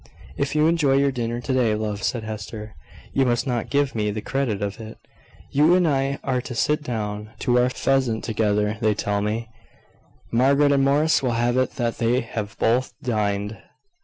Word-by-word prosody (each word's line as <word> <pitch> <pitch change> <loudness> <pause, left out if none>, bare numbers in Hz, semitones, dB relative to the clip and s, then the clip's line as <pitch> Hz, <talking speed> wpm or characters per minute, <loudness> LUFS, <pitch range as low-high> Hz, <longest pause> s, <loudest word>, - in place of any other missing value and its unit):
"If 140 - -2
you 155 0 +4
enjoy 160 -4 +3
your 140 0 +3
dinner 120 -1 -3
to 130 - -2
day, 120 -4 +2
love," 105 -1 -3
said 120 +2 -1
Hester, 110 0 -7 0.4
"you 135 - +3
must 120 -1 +1
not 120 -4 -2
give 140 -1 +1
me 105 -2 0
the 105 +1 -3
credit 120 -2 -1
of 100 +2 -4
it. 110 0 -9 0.5
You 155 +5 +5
and 180 -2 +3
I 140 -1 0
are 130 -2 0
to 125 - -7
sit 150 +6 +1
down 105 -5 -4
to 125 0 +3
our 125 +1 +3
pheasant 130 -3 0
together, 105 -1 0
they 110 -2 +2
tell 100 0 -1
me. 110 +2 -2 0.8
Margaret 140 +4 +4
and 140 -1 +3
Morris 145 +3 +3
will 125 -3 0
have 120 +1 +1
it 130 0 +1
that 115 -2 -2
they 120 +2 +2
have 110 -3 -6
both 125 +3 +1
dined." 105 -3 -1
120 Hz, 190 wpm, -23 LUFS, 110-135 Hz, 0.8 s, You